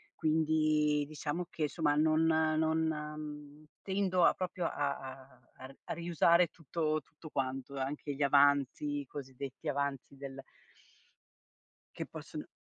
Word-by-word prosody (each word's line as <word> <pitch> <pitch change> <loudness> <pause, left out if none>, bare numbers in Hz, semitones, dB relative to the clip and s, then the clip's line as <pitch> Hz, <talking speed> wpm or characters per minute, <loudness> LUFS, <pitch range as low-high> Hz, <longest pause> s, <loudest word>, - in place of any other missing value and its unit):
Quindi 155 -1 +2
diciamo 155 +3 -3
che 155 -3 -1
somma 150 -3 +1
non 155 +1 +4
non 160 0 +3
mhmm, 150 -1 -6 0.2
tendo 190 -2 +1
a - - +6
proprio 180 -1 -3
a 140 -1 0
a 130 -1 -10 0.2
a 130 - -9
r 135 - -15
a - - -3
riusare 170 0 +4
tutto 155 0 -1
tutto 155 +2 -13
quanto, 135 0 -3
anche 140 +2 -3
gli 145 - 0
avanzi, 145 +1 +3
i 140 - -10
cosiddetti 135 +2 -7
avanzi 140 -1 -2
del 135 -1 -7 1.5
che - - -3
possono - - -8
150 Hz, 135 wpm, -33 LUFS, 140-160 Hz, 1.5 s, a